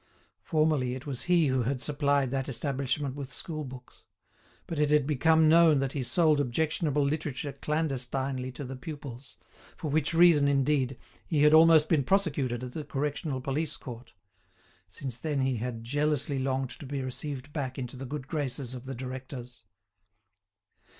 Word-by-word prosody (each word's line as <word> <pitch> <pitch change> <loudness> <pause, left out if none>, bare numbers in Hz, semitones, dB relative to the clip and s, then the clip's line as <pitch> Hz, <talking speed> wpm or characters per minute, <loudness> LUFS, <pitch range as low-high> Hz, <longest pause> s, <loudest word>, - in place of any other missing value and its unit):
Formerly 155 -6 +1
it 130 +3 -8
was 135 -4 -4
he 175 -3 +5
who 130 -2 +1
had 130 +3 -1
supplied 140 -1 +1
that 135 0 -2
establishment 135 +1 -2
with 135 -2 -7
school 155 +3 -5
books. 125 -2 -11 0.6
But 165 - -4
it 150 -1 +3
had 150 -2 +4
become 160 +2 +4
known 165 -1 +6
that 135 -1 0
he 140 - -3
sold 150 +4 +3
objectionable 150 +2 0
literature 145 -1 -2
clandestinely 135 -3 -2
to 140 - -6
the 135 0 -6
pupils; 135 -2 -9 0.4
for 155 - -4
which 150 0 +1
reason, 165 -4 +6
indeed, 135 -2 +1 0.3
he 150 -3 +2
had 150 0 +6
almost 160 -1 +7
been 155 -4 +2
prosecuted 140 -9 0
at 125 - -5
the 155 - -4
Correctional 145 -1 -3
Police 140 +4 -2
Court. 120 -1 -9 0.8
Since 125 +5 -6
then 150 -2 -1
he 130 -2 +1
had 115 0 -4
jealously 145 +2 0
longed 130 -1 -1
to 140 - -8
be 140 -1 -3
received 140 +2 -5
back 130 -4 -3
into 125 -1 -5
the 130 +1 -7
good 140 -1 -5
graces 135 -4 -3
of 125 0 -8
the 135 0 -5
directors. 125 -2 -7
140 Hz, 165 wpm, -29 LUFS, 130-150 Hz, 0.8 s, almost